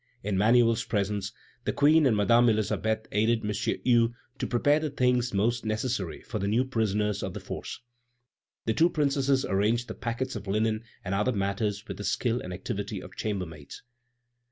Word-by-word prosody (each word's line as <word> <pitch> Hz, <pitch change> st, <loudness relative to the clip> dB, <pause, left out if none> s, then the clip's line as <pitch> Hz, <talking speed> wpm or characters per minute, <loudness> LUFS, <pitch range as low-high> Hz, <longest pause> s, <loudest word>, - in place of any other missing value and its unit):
In 100 Hz, 0 st, -1 dB
Manuel's 115 Hz, +3 st, +4 dB
presence, 100 Hz, -2 st, -1 dB, 0.3 s
the -, -, 0 dB
Queen 150 Hz, +1 st, +5 dB
and 110 Hz, -4 st, +2 dB
Madame 115 Hz, +4 st, +5 dB
Elisabeth 110 Hz, +1 st, 0 dB
aided 110 Hz, +2 st, +1 dB
M. 105 Hz, -, 0 dB
Hue 120 Hz, +2 st, +1 dB, 0.2 s
to -, -, -1 dB
prepare 145 Hz, +5 st, +3 dB
the 155 Hz, -1 st, -2 dB
things 125 Hz, -2 st, +1 dB
most 115 Hz, +4 st, +1 dB
necessary 110 Hz, -4 st, -2 dB
for 110 Hz, -, -4 dB
the 100 Hz, -, -1 dB
new 115 Hz, +5 st, +2 dB
prisoners 105 Hz, -4 st, 0 dB
of 95 Hz, -, -4 dB
the -, -, -4 dB
Force. -, -, -7 dB, 0.8 s
The 110 Hz, -, +1 dB
two 165 Hz, +6 st, +4 dB
Princesses 140 Hz, -4 st, +1 dB
arranged 110 Hz, +5 st, +1 dB
the -, -, -5 dB
packets 120 Hz, +2 st, -3 dB
of 105 Hz, -2 st, -6 dB
linen 110 Hz, +2 st, 0 dB, 0.2 s
and 95 Hz, -, -2 dB
other 105 Hz, +6 st, +1 dB
matters 100 Hz, +1 st, -2 dB
with -, -, -6 dB
the 105 Hz, -, -6 dB
skill 115 Hz, +4 st, 0 dB
and 90 Hz, -, -7 dB
activity 100 Hz, +2 st, -4 dB
of -, -, -11 dB
chambermaids. 90 Hz, -9 st, -5 dB
110 Hz, 175 wpm, -28 LUFS, 100-120 Hz, 0.8 s, Queen